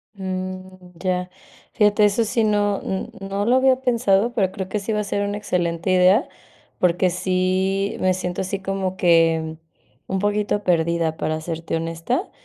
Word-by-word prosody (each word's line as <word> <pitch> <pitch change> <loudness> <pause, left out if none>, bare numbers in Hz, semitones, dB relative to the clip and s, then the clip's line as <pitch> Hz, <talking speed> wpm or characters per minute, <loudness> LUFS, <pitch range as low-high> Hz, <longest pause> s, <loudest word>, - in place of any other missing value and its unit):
Mm, 185 -1 -6
ya. 180 +1 -2 0.4
Fíjate, 210 0 +4
eso 210 +3 +2
sí 225 +1 0
no 205 -1 +1
n 190 - -3
no 195 +1 -3
lo 245 +3 +4
había 260 0 +3
pensado, 235 -2 +2
pero 195 -6 +1
creo 190 -2 -5
que 210 - -1
sí 200 +2 -4
va 210 - 0
a - - -2
ser 200 0 -1
una 205 0 -3
excelente 175 -3 -1
idea, 185 - +4 0.5
porque 180 +1 +2
sí, 185 +2 0
me 185 0 +2
siento, 180 -1 -3
así 190 +1 -3
como 190 -1 -3
que 165 -2 +3 0.5
un 190 - -1
poquito 205 0 0
perdida, 165 -2 +1
para 155 0 -2
serte 165 0 -4
honesta, 165 - -2
190 Hz, 165 wpm, -22 LUFS, 180-205 Hz, 0.5 s, Fíjate